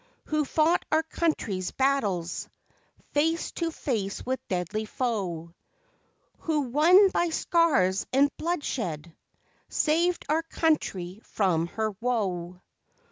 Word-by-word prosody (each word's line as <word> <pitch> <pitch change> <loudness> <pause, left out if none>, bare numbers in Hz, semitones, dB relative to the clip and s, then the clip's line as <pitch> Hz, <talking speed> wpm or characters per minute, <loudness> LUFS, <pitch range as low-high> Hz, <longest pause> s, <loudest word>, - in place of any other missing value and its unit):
Who 305 -1 0
fought 320 +5 +2
our 315 - +3
country's 265 - -1
battles, 205 -11 0 0.6
Face 325 +3 +1
to 335 -1 -2
face 220 -11 -3
with 260 +1 -1
deadly 185 +4 -2
foe, 185 -10 -3 0.9
Who 310 -2 0
won 320 +10 +5
by 345 -1 +1
scars 290 - +2
and 280 +2 +3
bloodshed, 220 - -3 0.5
Saved 340 +3 +1
our 310 +2 +2
country 220 - -1
from 170 -5 0
her 220 +4 -2
woe? 185 -7 -2
255 Hz, 105 wpm, -27 LUFS, -, 0.9 s, won